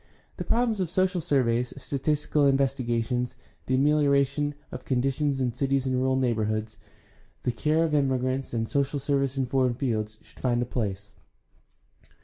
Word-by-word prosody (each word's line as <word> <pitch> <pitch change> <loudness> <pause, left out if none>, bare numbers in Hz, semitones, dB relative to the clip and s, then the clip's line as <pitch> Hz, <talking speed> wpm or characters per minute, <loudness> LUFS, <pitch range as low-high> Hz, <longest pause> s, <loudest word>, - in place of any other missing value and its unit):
The - - -3
problems 230 -3 +1
of 180 -4 -1
social 185 0 +1
surveys, 125 -5 +1
statistical 145 +1 0
investigations, 125 -3 0 0.3
the 130 - +2
amelioration 145 0 +2 0.2
of - - -7
conditions 135 +2 0
in 125 -2 0
cities 135 0 0
and 130 -1 0
rural 130 +1 +1
neighborhoods, 110 -4 -1 0.6
the 125 - +1
care 155 +7 +1
of 160 -2 -1
immigrants, 130 -2 0
and 115 -1 -1
social 140 +2 0
service 140 -1 0
in 135 - +1
foreign 125 -1 +1
fields 110 -4 -2
should - - -18
find 120 -2 +1
a 120 - 0
place. 105 -4 -4
135 Hz, 145 wpm, -27 LUFS, 120-145 Hz, 0.6 s, the